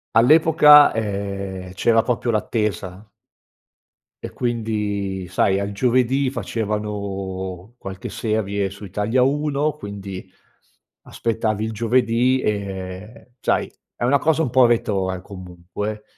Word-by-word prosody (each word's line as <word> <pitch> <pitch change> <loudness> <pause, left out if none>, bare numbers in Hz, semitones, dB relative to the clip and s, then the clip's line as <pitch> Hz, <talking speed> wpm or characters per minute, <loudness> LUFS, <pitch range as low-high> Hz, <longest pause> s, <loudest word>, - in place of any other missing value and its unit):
all'epoca, 150 +3 +7
ehm, 100 -3 -4
c'era 115 +3 +3
proprio 120 -1 -1
l'attesa 105 -3 -2 1.2
e - - -4
quindi, 105 -5 -2
sai, 95 +1 +2
al 100 0 -3
giovedì 130 +4 +1
facevano 100 -4 -4
qualche 95 -1 -7
serie 100 -3 -1
su 100 +2 -10
Italia 105 +6 0
1, 145 +2 +1
quindi 100 -7 -8 0.7
aspettavi 110 -2 -2
il 110 - -3
giovedì. 120 +3 +2
Ehm, 100 +2 -5
sai, - - 0 0.3
è - - -5
una 135 +4 +3
cosa 160 +3 +2
un 125 - -2
po' 125 -1 +6
retrò, 100 -5 0
eh, 90 - -8
comunque. 95 +3 -7
105 Hz, 110 wpm, -21 LUFS, 95-120 Hz, 1.2 s, all'epoca